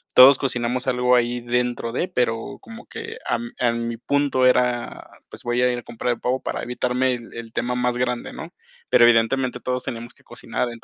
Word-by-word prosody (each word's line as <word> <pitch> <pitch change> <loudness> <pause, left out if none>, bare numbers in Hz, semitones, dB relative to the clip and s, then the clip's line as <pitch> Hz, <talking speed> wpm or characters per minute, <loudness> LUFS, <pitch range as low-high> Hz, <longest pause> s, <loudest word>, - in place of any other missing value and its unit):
todos 130 +1 +9
cocinamos 125 0 -2
algo 125 0 +3
ahí 120 0 0
dentro 120 -1 -1
de, 150 +9 -1
pero, 120 -9 -1
como 230 +1 -11
que 455 0 -7
am, 240 0 -2
a 120 -2 +2
mi 115 0 -3
punto 140 +1 +1
era, 125 -1 +1 0.2
pues, - - -9
voy 120 +1 0
a 125 - +4
ir 120 - -2
a - - -12
comprar 120 +1 -2
el - - -11
pavo 130 +1 0
para - - -4
evitarme 125 +1 0
el 120 -1 -11
el 115 -1 -8
tema 125 +2 -2
más 125 0 0
grande, 125 -1 -2
¿no?, - - -9 0.3
pero - - +5
evidentemente 120 +2 +3
todos 125 0 -2
tenemos 120 0 -6
que - - -26
cocinar. 125 - -4
125 Hz, 200 wpm, -23 LUFS, 120-130 Hz, 0.3 s, todos